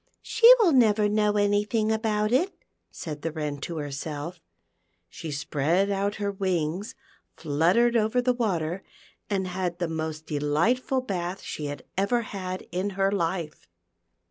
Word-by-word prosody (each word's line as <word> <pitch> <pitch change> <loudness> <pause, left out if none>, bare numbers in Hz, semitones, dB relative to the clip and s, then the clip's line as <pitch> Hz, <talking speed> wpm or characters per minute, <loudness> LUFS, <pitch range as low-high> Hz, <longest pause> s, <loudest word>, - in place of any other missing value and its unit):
"She 460 +2 +7
will 400 -7 +5
never 220 -6 +4
know 210 0 +2
anything 210 +2 +1
about 215 -1 0
it," 340 +11 +2 0.4
said 150 -3 -7
the 165 - -2
Wren 150 -2 -4
to 165 +3 -5
herself 150 +3 -5 0.7
She 160 - -7
spread 155 +7 0
out 200 +1 0
her 205 -1 -2
wings, 190 +3 -2 0.4
fluttered 175 +11 +2
over 220 +2 +2
the 250 0 +2
water, 185 -7 -1 0.5
and 195 -2 0
had 180 -1 -3
the 175 -1 -1
most 160 -1 -4
delightful 170 - +1
bath 185 -5 -4
she 150 - -5
had 145 0 -6 0.2
ever 235 +5 +1
had 185 -3 -5
in 190 +3 -1
her 195 0 +2
life. 170 -4 -2
190 Hz, 145 wpm, -26 LUFS, 160-215 Hz, 0.7 s, She